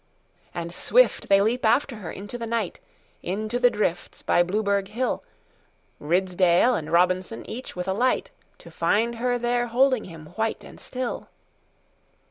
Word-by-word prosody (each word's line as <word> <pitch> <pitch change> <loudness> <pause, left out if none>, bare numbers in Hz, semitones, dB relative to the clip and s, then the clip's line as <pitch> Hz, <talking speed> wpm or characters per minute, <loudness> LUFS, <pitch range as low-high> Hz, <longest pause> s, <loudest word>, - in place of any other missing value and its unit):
And 170 0 -4
swift - - +3
they 195 0 +6
leap 230 +5 +1
after 240 +2 +2
her 200 - -7
into 205 +4 -8
the 235 -1 -4
night, 225 -5 -2 0.4
Into 215 +6 -2
the 245 - +6
drifts 195 -6 -2
by - - +3
Blueberg 200 +2 0
hill, 240 +5 -2 0.8
Ridsdale 180 +6 +3
and 160 -7 -3
Robinson, 185 +5 +1
each 255 +3 -7
with 180 +1 -4
a 190 - +1
light, 250 +6 +1 0.3
To - - -14
find 230 +3 +1
her 245 +1 0
there 240 0 0
holding 255 0 +2
him 165 -3 -10
white 225 0 -1
and - - -13
still. 255 -1 -5
215 Hz, 150 wpm, -25 LUFS, 185-240 Hz, 0.8 s, they